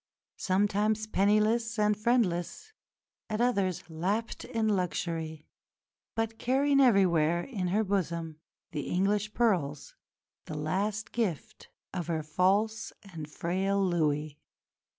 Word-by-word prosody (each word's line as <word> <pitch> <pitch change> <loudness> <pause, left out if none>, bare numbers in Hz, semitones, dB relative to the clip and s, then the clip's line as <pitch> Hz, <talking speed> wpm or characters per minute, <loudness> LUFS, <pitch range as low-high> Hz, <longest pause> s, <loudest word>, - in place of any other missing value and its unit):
Sometimes 205 +2 +1
penniless 215 +3 +2
and 210 0 +3
friendless, 225 - 0 0.6
at 215 0 -2
others 200 -7 +1
lapped 190 +8 -2
in 225 -3 -1
luxury; 165 -5 -2 0.7
but 225 0 -2
carrying 275 +3 +2
everywhere 175 - +4
in 200 -9 -3
her 205 +5 +2
bosom 170 -5 -2 0.3
the 145 - -4
English 205 +3 0
pearls, 170 - 0 0.5
the 155 - -6
last 195 +8 -2
gift 205 -10 -3 0.2
of 175 -3 -3
her 160 -2 -1
false 195 +8 +1 0.2
and 155 -2 -7
frail 190 +6 -1
Louis. 150 -4 0
195 Hz, 110 wpm, -30 LUFS, 170-220 Hz, 0.7 s, everywhere